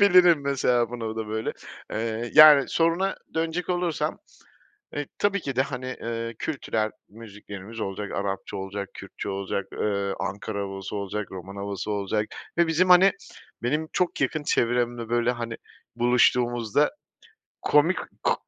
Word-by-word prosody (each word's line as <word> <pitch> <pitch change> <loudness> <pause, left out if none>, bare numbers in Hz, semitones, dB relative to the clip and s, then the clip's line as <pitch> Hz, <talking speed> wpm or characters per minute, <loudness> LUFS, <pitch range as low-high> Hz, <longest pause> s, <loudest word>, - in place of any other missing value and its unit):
Diyebilirim 180 -6 +6
mesela 125 -4 +1
bunu 120 -2 -5
o 110 0 -4
da 110 -1 -4
böyle, 110 +1 -2 0.4
eee, 115 +1 -2
yani 150 -3 +10
soruna 170 +4 +1 0.2
dönecek 165 +2 -1
olursam, 175 -3 -1 0.8
eee, 145 -1 -3
tabii 200 -1 +2
ki 135 -3 -4
de, - - 0
eee, 130 -1 -4
hani, 115 0 -4
kültürel 110 -8 -1 0.2
müziklerimiz 105 0 -10
olacak, 100 0 -4
Arapça 100 -1 -3
olacak, 100 +1 -5
Kürtçe - - -7
olacak, 100 0 -2
eee, 100 -1 0
Ankara 100 0 -3
havası 95 0 -5
olacak, 100 0 -4
Roman 95 +1 -8
havası 100 +1 -4
olacak 105 +1 0 0.3
ve 170 -1 +4
bizim 175 +3 +2
hani, 185 +2 +8 0.5
benim 150 +6 0
çok 180 -1 0
yakın 155 -2 0
çevremde 120 -2 0
böyle 120 +1 +2
hani, 115 -2 -5 0.4
buluştuğumuzda 120 +1 +3 0.7
komik 155 +5 +4 0.3
ku - - +4
120 Hz, 140 wpm, -26 LUFS, 105-150 Hz, 0.8 s, yani